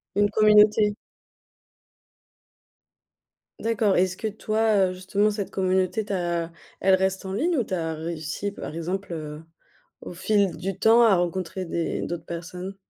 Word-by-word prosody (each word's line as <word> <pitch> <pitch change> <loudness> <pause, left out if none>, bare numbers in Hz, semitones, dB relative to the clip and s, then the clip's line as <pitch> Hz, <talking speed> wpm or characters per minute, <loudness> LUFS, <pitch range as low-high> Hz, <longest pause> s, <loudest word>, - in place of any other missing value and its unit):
Une 205 0 +3
communauté. 210 -1 +5 2.6
D'accord, 220 -3 +1
est-ce 185 0 +1
que 220 - -3
toi, 215 -2 +1
heu, - - -5
justement 200 +3 0
cette 205 -2 -4
communauté, 190 +2 0
tu 205 - -8
as 170 -2 -1 0.3
elle 190 0 +5
reste 190 0 -1
en 190 - -4
ligne 320 - 0
ou 245 - +2
tu 190 - -7
as 165 -2 -1
réussi 160 +4 -4
par 160 - -8
exemple, 180 +3 -4
heu, 155 -1 -6 0.6
au - - -7
fil 200 +1 +1
du 190 0 -4
temps 230 +3 +5
à 220 -4 +5
rencontrer 180 +1 -2
des 165 -1 -2
d'autres 170 -1 -4
personnes? 180 +3 -7
190 Hz, 150 wpm, -25 LUFS, 175-210 Hz, 2.6 s, communauté